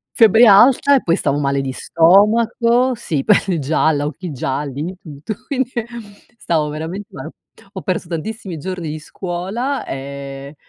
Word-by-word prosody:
Febbre 225 +1 +6
alta 245 +7 +6
e 265 - +2
poi 170 - +2
stavo 145 -6 -1
male 140 -1 0
di 135 -1 -3
stomaco 230 - +3
sì, 155 -10 -3
pelle 195 -4 +2
gialla, 150 +1 +1
occhi 160 +3 -6
gialli, 140 +1 -4
di 180 +3 -5
tutto. 155 +6 -7
Quindi, 260 -2 -2
ehm, 235 -2 -2 0.5
stavo 155 -7 -1
veramente 165 +7 -6
male. - - -8 0.4
Ho - - -6
perso 185 -4 -3
tantissimi 180 +2 -5
giorni 175 +1 -5
di 155 +1 -5
scuola 190 - -4
e 140 +1 -7
175 Hz, 150 wpm, -18 LUFS, 145-220 Hz, 0.5 s, Febbre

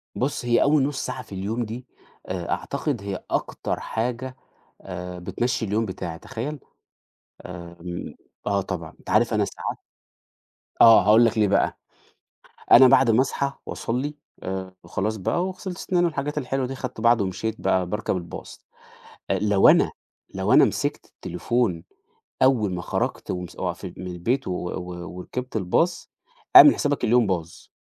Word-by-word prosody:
بُص، 130 -1 -2
هي 120 -1 +3
أول 145 -1 +4
نُص 145 0 -2
ساعة 130 - -4
في 110 - -18
اليوم 110 +6 -2
دي 120 +4 -7 0.4
آآ 90 -2 -4
أعتقد 140 -5 -2
هي 100 -2 -5
أكتر - - -2
حاجة 125 +3 -3 0.5
آآ 90 -1 -7
بتمشّي 115 +6 -2
اليوم 110 +3 0
بتاعي، 85 -4 -6
تخيل؟ 140 +6 -5 0.9
آمم 85 -1 -8 0.3
آه 100 -1 +2
طبعًا. 90 -4 -6
أنت - - -13
عارف 115 +4 +3
أنا 105 -2 +2
ساعات - - -5 1.0
آه، 115 -1 +9
هاقول 110 +3 +6
لك 115 -1 +1
ليه 105 -2 +4
بقى. 100 - +1 0.9
أنا 130 +2 +10
بعد 125 -1 +5
ما 115 +4 +4
أصحى 140 0 -1
وأصلّي 135 +6 -3 0.3
آآ 95 0 -4
وخلاص 110 +3 -2
بقى 175 - 0
وغسلت 185 -1 -6
سِناني 175 -1 +1
والحاجات 150 -2 -2
الحلوة 135 -1 -1
دي، 135 - -5
خدت 125 -4 -6
بَعضي 115 -2 +4
ومشيت 105 +4 -3
بقى 95 -1 +2
باركب 105 +1 -2
الباص، 85 -1 -9 0.7
آآ - - +2
لو 105 -2 +4
أنا - - +5 0.4
لو - - 0
أنا - - +8
مسكْت - - -2
التليفون 90 -1 -2 0.6
أول 115 -8 +3
ما 90 - -3
خرجت - - -2
ومس 90 -1 -5
وف 90 +1 -3
من 90 0 -7
البيت 115 +10 -2
و - - -2
و 90 -1 -5
وركبت 125 +6 -5
الbus 165 - 0 0.5
اعمل 350 -6 +11
حسابك 145 -1 -1
اليوم 120 0 +4
باظ. 85 -3 -4
110 Hz, 155 wpm, -24 LUFS, 90-130 Hz, 1.0 s, اعمل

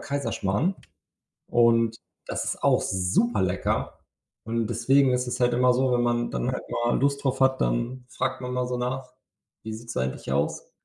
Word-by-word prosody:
Kaiserschmarrn 140 - -1 0.7
und 115 -1 +3 0.3
das - - -2
ist - - -3
auch - - +4
super 95 +4 +1
lecker 95 0 -1 0.5
und 115 0 -1
deswegen 130 +3 +3
ist 125 0 0
es 125 +1 -3
halt 120 -1 +3
immer 125 +1 +4
so, 130 +1 +1
wenn 120 - +2
man 120 0 +1
dann 60 -1 -1
halt - - -4
mal 120 0 0
Lust 140 +1 +1
drauf 135 -1 0
hat, 130 0 +3
dann 120 - -1
fragt 130 +2 -2
man 125 0 -4
mal 125 0 -1
so 125 - -2
nach: 125 +1 -3 0.5
„Wie 110 - -5
sieht's 115 +2 -8
eigentlich 65 +1 -3
aus? 70 +2 -1
120 Hz, 175 wpm, -26 LUFS, 110-130 Hz, 0.7 s, auch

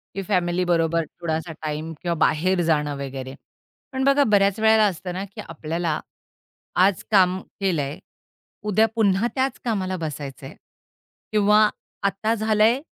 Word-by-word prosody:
की 195 - -2
फॅमिलीबरोबर 175 -3 +1
थोडासा 160 0 -4
टाईम 155 +1 -4
किंवा 170 -1 -1
बाहेर 185 +4 +1
जाणं 150 -3 +1
वगैरे. 135 -1 -6 0.6
पण 265 0 -2
बघा 275 +1 +4
बऱ्याच 200 -2 +3
वेळेला 220 0 +5
असतं 180 -2 -3
ना, 185 +2 -3
की 200 - -9
आपल्याला 165 0 -3 0.9
आज 195 -4 +1
काम 185 -2 +4 0.2
केलंय 160 -6 -1 0.7
उद्या 220 +2 +4
पुन्हा 205 0 +2
त्याच 265 -1 0
कामाला 190 -5 -1
बसायचंय 145 -3 -6 0.8
किंवा 210 0 +5 0.4
आता 205 +3 0
झालंय 220 +4 +3
185 Hz, 125 wpm, -23 LUFS, 160-210 Hz, 0.9 s, वेळेला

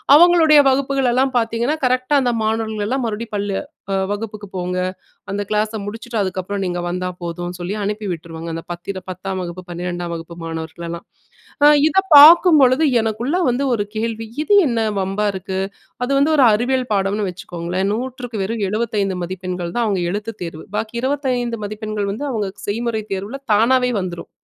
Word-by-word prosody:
அவங்களுடைய 325 -2 +7
வகுப்புகளலாம் 265 -1 +1
பாத்தீங்கன்னா, 235 +5 0
கரெக்டா 255 +3 +1
அந்த 245 -1 +1
மாணவர்களலாம் 220 +3 -1
மறுபடியும் 220 +1 -5
பள்ள 200 0 -2 0.6
வகுப்புக்கு 210 -1 -5
போங்க, 180 0 -2 0.5
அந்த 205 +1 -2
கிளாஸ 215 +1 +1
முடிச்சுட்டு 225 +2 -5
அதுக்கப்புறம் 190 +1 -3
நீங்க 175 0 -2
வந்தா 180 +1 -2
போதும்னு 175 +1 -5
சொல்லி 175 +3 -3
அனுப்பி 210 +1 -3
விட்ருவாங்க, 165 0 -6
அந்த 165 - -5
பத்தி 175 +3 -5 0.2
10ஆம் 190 +1 -4
வகுப்பு 175 +1 -7
12ஆம் 175 0 -4
வகுப்பு 165 +1 -8
மாணவர்களலாம். 165 +1 -6 0.6
அ - - +9 0.2
இதப்பார்க்கும் 330 -1 +8
பொழுது 260 +4 +4 0.2
எனக்குள்ள 230 +8 -1
வந்து 250 +3 0
ஒரு 205 -3 0
கேள்வி, 225 0 -3 0.2
இது 410 - +1
என்ன 235 -2 0 0.2
வம்பா 195 +2 -1
இருக்கு? 190 0 -4 0.4
அது 260 - -1
வந்து 310 +3 +3
ஒரு 275 - +5
அறிவியல் 250 +2 0
பாடம்னு 200 +1 0
வச்சுக்கோங்களேன், 180 0 -3
100க்கு 245 -2 -4
வெறும் 220 +1 -2
75 210 -3 -1
மதிப்பெண்கள் 180 -1 -4
தான் 235 - +2
அவங்க 195 -3 0
எழுத்துத் 210 +2 -5
தேர்வு. 165 -2 -7
பாக்கி 225 +2 -3
25 250 -4 -1
மதிப்பெண்கள் 215 -1 -3
வந்து 265 +8 -4
அவங்க 210 -4 -2 0.2
செய்முறைத் 220 -1 -2
தேர்வுல 205 +8 -5
தானாவே 250 +3 +3
வந்துரும். 175 -2 -6
215 Hz, 150 wpm, -20 LUFS, 185-245 Hz, 0.6 s, அ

